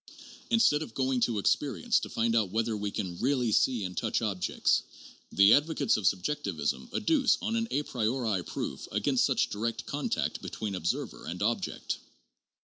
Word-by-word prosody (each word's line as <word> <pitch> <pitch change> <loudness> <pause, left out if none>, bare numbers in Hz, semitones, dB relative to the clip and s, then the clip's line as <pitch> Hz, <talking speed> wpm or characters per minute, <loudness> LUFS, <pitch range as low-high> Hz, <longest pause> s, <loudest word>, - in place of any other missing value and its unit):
Instead 225 -10 +4
of 155 - -7
going 130 -1 +1
to 120 0 +1
expe 125 +7 +1
rience 235 -2 +2
to - - -5
find 115 0 0
out 110 -4 +2
whether 110 +2 0
we 105 -1 -2
can 90 -3 -4
really 125 -3 +1
see 120 +1 +2
and 90 -1 -5
touch 110 - 0
objects, 100 -5 +1 0.5
the 100 +3 +6
advocates 145 -4 +2
of 100 -4 0
subjectivism 85 - -1
adduce 270 +1 +2
an 230 +1 0
a 145 - 0
priori 115 -6 -1
proof - - -5
against - - +1
such - - +1
direct 115 +3 -3
contact 145 0 -2
between 105 -2 -4
observer 90 -2 -3
and - - -4
object. - - -2
115 Hz, 160 wpm, -29 LUFS, 100-140 Hz, 0.5 s, the